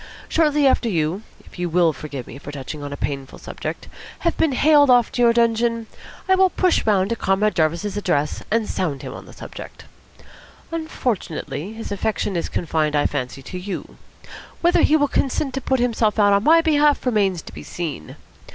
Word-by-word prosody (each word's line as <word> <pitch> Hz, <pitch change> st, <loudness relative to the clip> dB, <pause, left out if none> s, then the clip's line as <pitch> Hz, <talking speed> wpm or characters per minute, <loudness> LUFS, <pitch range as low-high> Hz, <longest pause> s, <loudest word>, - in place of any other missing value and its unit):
Shortly 300 Hz, -3 st, +2 dB
after 255 Hz, -3 st, +3 dB
you 165 Hz, +1 st, -1 dB, 0.2 s
if -, -, -15 dB
you 175 Hz, -1 st, -1 dB
will 170 Hz, -1 st, +3 dB
forgive 140 Hz, -4 st, -7 dB
me 135 Hz, -, -10 dB
for 145 Hz, -, -8 dB
touching 145 Hz, +1 st, -7 dB
on 145 Hz, 0 st, -6 dB
a 145 Hz, -, -5 dB
painful 135 Hz, -1 st, -4 dB
subject -, -, -6 dB, 0.3 s
have 335 Hz, -, +1 dB
been 315 Hz, -4 st, +1 dB
haled 290 Hz, +1 st, +5 dB
to 245 Hz, 0 st, +3 dB
your 235 Hz, -1 st, +6 dB
dungeon, 230 Hz, 0 st, +1 dB, 0.4 s
I 380 Hz, -, +4 dB
will 375 Hz, 0 st, +5 dB
push 365 Hz, 0 st, +1 dB
round 200 Hz, -1 st, +2 dB
to -, -, +1 dB
Comrade 205 Hz, 0 st, +1 dB
Jarvis's 170 Hz, +6 st, 0 dB
address, 150 Hz, -8 st, -1 dB
and 225 Hz, -1 st, +1 dB
sound 155 Hz, -7 st, -2 dB
him -, -, -6 dB
on -, -, -10 dB
the -, -, -12 dB
subject. -, -, -10 dB, 0.9 s
Unfortunately, 220 Hz, -, -3 dB
his 225 Hz, -1 st, -7 dB
affection 205 Hz, -1 st, -1 dB
is 170 Hz, -, -2 dB
confined, 155 Hz, -2 st, -1 dB
I 145 Hz, -, +2 dB
fancy, 135 Hz, -1 st, -3 dB
to 180 Hz, -, -7 dB
you. 195 Hz, +2 st, -6 dB, 0.6 s
Whether 345 Hz, 0 st, +4 dB
he 310 Hz, -, +4 dB
will 290 Hz, -2 st, +3 dB
consent 270 Hz, 0 st, -1 dB
to 270 Hz, -, -3 dB
put 265 Hz, 0 st, 0 dB
himself 230 Hz, -3 st, +1 dB
out 205 Hz, -1 st, +5 dB
on 200 Hz, +1 st, +3 dB
my 330 Hz, +4 st, +6 dB
behalf 300 Hz, -3 st, +3 dB
remains 200 Hz, -8 st, +1 dB
to -, -, -12 dB
be -, -, -8 dB
seen. 155 Hz, -, -6 dB
210 Hz, 190 wpm, -21 LUFS, 160-265 Hz, 0.9 s, your